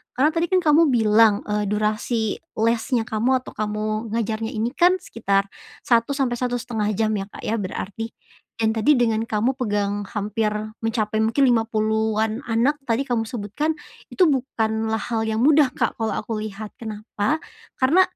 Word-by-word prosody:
Karena 275 +4 +4
tadi, 335 +1 0
kan, 370 +1 +3
kamu 310 0 +5
bilang, 220 -1 +5
eee, 210 0 -1
durasi 215 +2 -1 0.2
lesnya 230 +2 +1
kamu 245 +3 0
atau - - -9
kamu 215 +1 -2
ngajarnya 225 0 -2
ini, 225 +3 -1
kan, 355 +5 +4
sekitar 200 - -1 0.3
1 235 +3 +2
sampai 245 -4 0
1,5 245 -3 -2
jam 220 +1 +1
ya, 200 -2 -2
Kak, - - -12
ya 225 0 -1
berarti, 205 +3 -5 0.4
yang 220 -1 +1
tadi 230 +6 +3
dengan 225 -2 +2
kamu 230 +3 0
pegang 205 -5 -1
hampir 210 +1 -1 0.3
mencapai 220 -1 0
mungkin 230 +5 +3
50-an 220 -1 +1
anak 270 +6 +1
tadi 235 +4 +1
kamu 245 -4 0
sebutkan, 265 +8 -2 0.3
itu 370 - +3
bukanlah 220 -6 0
hal 225 0 -2
yang 220 - -1
mudah, 295 -2 +5
Kak, - - +1
kalau 225 -2 -2
aku 220 -2 -3
lihat. 215 0 -7
Kenapa? 215 +4 -3 0.4
Karena 285 +8 +4
225 Hz, 155 wpm, -23 LUFS, 215-250 Hz, 0.4 s, kamu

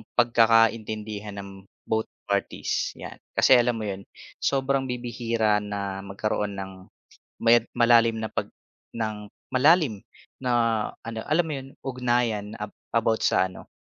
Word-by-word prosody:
pagkakaintindihan 110 -3 +2
ng 95 -1 -10 0.2
both 110 0 0 0.2
parties, 100 0 -1
'yan. - - -9 0.2
Kasi 130 - +6
alam 120 0 +2
mo 110 - -4
yun, 100 -1 -5 0.4
sobrang 135 0 +1
bibihira 115 -3 0
na 100 -2 -4
magkaroon 100 +1 -2
ng 95 0 -5 0.7
maya 115 0 +5
malalim 115 -1 +5
na 110 - -2
pag - - -3 0.4
ng 110 -2 -4 0.2
malalim 130 - +4 0.4
na 125 - -1 0.6
ano, 115 -1 -4
alam 165 +3 +2
mo 160 - -4
yun, 135 -1 -6 0.2
ugnayan 120 -5 0
ab 105 0 -6 0.2
about 115 0 +1
sa 95 - +3
ano, 90 - -12
115 Hz, 130 wpm, -26 LUFS, 105-120 Hz, 0.7 s, Kasi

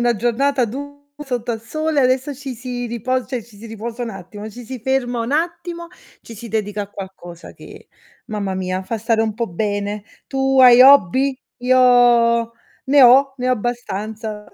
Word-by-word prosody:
una 240 0 +2
giornata 250 +4 +1
du 285 +5 -7 0.2
sotto 250 -5 -4
al 225 - -5
sole, 310 +6 -1
e 260 - +3
adesso 260 +3 0
ci 270 -1 -7
si 245 0 -5
ripos 245 +2 -2
cioè, 250 -3 -4
ci 215 -2 -19
si 225 - -10
riposa 225 +2 -6
un 235 - -4
attimo, 205 +2 -9
ci 240 +3 -11
si 255 0 -8
ferma 245 -1 -1
un 230 +4 -3
attimo, 340 +2 -3 0.3
ci 230 - -12
si 230 +2 -9
dedica 210 -1 -2
a 200 - -10
qualcosa 185 -4 -10
che, - - -14 0.4
mamma 200 -3 -3
mia, 185 0 -3
fa 225 +4 -4
stare 225 +1 +1
un 220 -1 -2
po' 235 +1 -2
bene. 205 +2 -3 0.2
Tu 270 -1 +1
hai 250 -1 +8
hobby? 265 0 +5 0.2
Io 245 -2 +4 0.3
ne 280 +1 +5
ho, 265 +2 +6
ne 250 -1 -2
ho - - +3
abbastanza. 220 -2 -5
240 Hz, 180 wpm, -19 LUFS, 215-260 Hz, 0.4 s, hai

